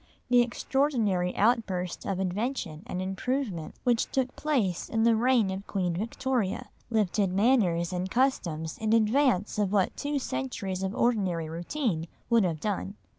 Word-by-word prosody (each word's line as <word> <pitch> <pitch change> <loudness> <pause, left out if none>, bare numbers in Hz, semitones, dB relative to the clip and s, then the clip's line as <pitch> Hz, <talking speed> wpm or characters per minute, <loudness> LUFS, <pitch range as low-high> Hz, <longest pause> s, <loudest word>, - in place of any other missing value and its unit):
The 245 -1 +6
extraordinary 235 -7 0
outburst 200 -6 0
of 195 -2 -1
invention 190 - -2
and 185 -4 -3
improvement 195 - -3
which 240 -3 +1
took 260 -1 -1
place 235 - 0
in 225 0 +1
the 230 0 +5
reign 235 -3 +3
of 190 +1 -6
Queen 180 -3 -1
Victoria, 225 +2 -2 0.2
lifted 210 -3 +1
manners 190 -5 +2
and 180 +1 -2
customs 175 - 0
in 220 0 +1
advance 225 -2 +2
of 200 -2 +1
what 200 -3 +2
two 290 0 -2
centuries 185 - -3
of 190 +1 -2
ordinary 190 -9 +1
routine 175 - -2 0.2
would 230 -2 +5
have 165 -3 -1
done. 200 +1 -3
205 Hz, 145 wpm, -28 LUFS, 180-240 Hz, 0.2 s, The